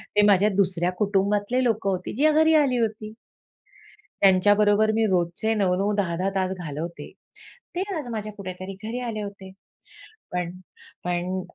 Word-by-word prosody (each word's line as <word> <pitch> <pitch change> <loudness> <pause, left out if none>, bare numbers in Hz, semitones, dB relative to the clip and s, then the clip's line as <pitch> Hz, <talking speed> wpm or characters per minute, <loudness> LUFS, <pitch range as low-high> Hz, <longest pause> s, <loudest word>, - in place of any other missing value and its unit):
ते 210 - +6
माझ्या 205 +1 +5
दुसऱ्या 180 -2 +1
कुटुंबातले 205 +4 +1
लोकं 220 -4 0
होते, 185 -1 -3
जे 305 +5 +4
घरी 315 +1 +4
आली 275 -5 +3
होती. 215 -2 -2 1.1
त्यांच्याबरोबर 205 +2 +4
मी 225 0 +2
रोजचे 180 +4 0
9-9 195 +1 +1
10-10 185 -1 -1
तास 185 -1 0
घालवते 165 +1 -6 0.6
ते 360 - -1 0.2
आज 285 -5 -5
माझ्या 215 -1 -4
कुठेतरी 185 -1 -7
घरी 235 +3 -4
आले 230 -3 -4
होते. 200 -2 -8 0.8
पण 180 -1 -2 0.5
पण 180 +1 -2
200 Hz, 135 wpm, -24 LUFS, 185-220 Hz, 1.1 s, ते